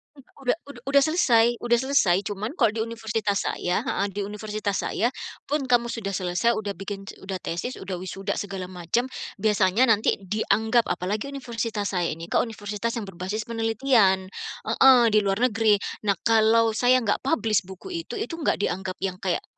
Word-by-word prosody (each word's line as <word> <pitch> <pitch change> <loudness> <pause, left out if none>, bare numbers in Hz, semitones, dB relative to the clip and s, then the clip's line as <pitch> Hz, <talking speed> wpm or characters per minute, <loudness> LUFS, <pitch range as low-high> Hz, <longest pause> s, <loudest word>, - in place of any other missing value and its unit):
U - - -17 0.3
udah 250 - +3
udah 240 -4 -11
udah 280 0 +5
selesai 240 -8 +3
udah 240 0 +2
selesai. 235 -10 +3
Cuman 210 - -4
kalau 230 -5 +4
di 220 0 -3
universitas 220 -3 -2
saya 180 0 -1
heeh, 200 - -1
di 205 - -1
universitas 210 0 -3
saya 230 - +1 0.4
pun 285 -3 0
kamu 240 -1 +2
sudah 195 -4 -4
selesai, 185 +6 +1
udah 210 -2 -3
bikin 195 0 -6
ce - - -11
udah 190 0 -5
tesis, 175 +10 -4
udah 190 -1 -5
wisuda, 190 +1 -4
segala 195 -2 -5
macam, 185 +9 -1 0.3
biasanya 210 +1 +3
nanti 215 0 +3
dianggap 220 +3 +1
apalagi 200 +7 -2
universitas 230 -6 -3
saya 175 -3 0
ini 165 +1 -10
ke - - +3
universitas 215 0 -3
yang 225 -3 -3
berbasis 190 +4 -4
penelitian 225 -4 +2 0.3
heeh, 260 -2 +6
di 215 - +5
luar 195 +1 0
negeri. 215 -1 +4 0.3
Nah 200 - +4
kalau 225 0 +4
saya 245 +2 +3
enggak 205 - +1
publish 225 -8 +1
buku 190 - -10 0.2
itu, - - -6
itu 415 -5 -4
enggak 300 - +1
dianggap 185 -1 -2
yang 185 -1 -2
kayak 180 -3 -1
215 Hz, 175 wpm, -25 LUFS, 195-235 Hz, 0.4 s, heeh